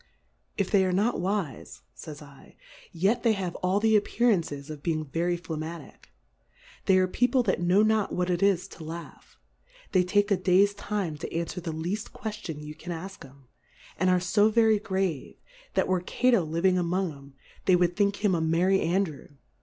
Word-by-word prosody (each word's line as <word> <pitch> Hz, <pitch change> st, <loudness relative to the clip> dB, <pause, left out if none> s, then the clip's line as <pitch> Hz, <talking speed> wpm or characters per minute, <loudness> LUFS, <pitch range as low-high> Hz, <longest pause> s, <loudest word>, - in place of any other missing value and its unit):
If 195 Hz, -, -1 dB
they 200 Hz, -2 st, +4 dB
are 185 Hz, -, +1 dB
not 205 Hz, +3 st, +1 dB
wife, 185 Hz, -, -3 dB
fays 150 Hz, -2 st, -9 dB
7, 140 Hz, -2 st, -15 dB, 0.4 s
yet 195 Hz, +7 st, +1 dB
they 230 Hz, -2 st, +3 dB
have 185 Hz, -4 st, -3 dB
all 185 Hz, +2 st, +1 dB
the 220 Hz, 0 st, +3 dB
Ap 205 Hz, -, +3 dB
pearances 165 Hz, -, 0 dB
of 150 Hz, -2 st, -8 dB
being 155 Hz, -1 st, -1 dB
very 170 Hz, +4 st, -1 dB
Flegmatick: 165 Hz, -1 st, -8 dB, 0.8 s
They 190 Hz, -, +5 dB
are. 185 Hz, 0 st, +3 dB
People 245 Hz, +6 st, +2 dB
that 190 Hz, -5 st, 0 dB
know 180 Hz, +4 st, +4 dB
not 215 Hz, -1 st, +2 dB
what 180 Hz, 0 st, -1 dB
it 175 Hz, -, -1 dB
is 195 Hz, -3 st, +2 dB
to 165 Hz, -, -11 dB
laugh, 165 Hz, 0 st, -9 dB, 0.5 s
they 185 Hz, -, +4 dB
take 205 Hz, +3 st, +1 dB
a 200 Hz, -, +4 dB
Days 190 Hz, +2 st, +3 dB
time 200 Hz, -6 st, -3 dB
to -, -, -5 dB
anfwer 170 Hz, +2 st, -3 dB
the 165 Hz, -1 st, -4 dB
leaft 175 Hz, +7 st, -4 dB
Queftion 205 Hz, -9 st, -6 dB
you 150 Hz, 0 st, -7 dB
can 160 Hz, +3 st, -8 dB
ask 185 Hz, +4 st, -7 dB
'em; 135 Hz, 0 st, -16 dB, 0.5 s
and 185 Hz, +2 st, +1 dB
are 180 Hz, 0 st, +4 dB
fo 205 Hz, +4 st, +3 dB
very 220 Hz, -1 st, +4 dB
grave, 190 Hz, -8 st, -2 dB, 0.4 s
that -, -, +2 dB
were 185 Hz, -1 st, +1 dB
Cato 235 Hz, +4 st, +2 dB
living 170 Hz, +4 st, +1 dB
among 180 Hz, +1 st, 0 dB
'em, 140 Hz, -1 st, -14 dB, 0.3 s
they 185 Hz, -, +5 dB
would 175 Hz, 0 st, +2 dB
think 205 Hz, 0 st, 0 dB
him 195 Hz, -, +3 dB
a 170 Hz, -, +1 dB
Merry 175 Hz, +4 st, +2 dB
Andrew. 170 Hz, -3 st, -1 dB
180 Hz, 185 wpm, -27 LUFS, 165-200 Hz, 0.8 s, They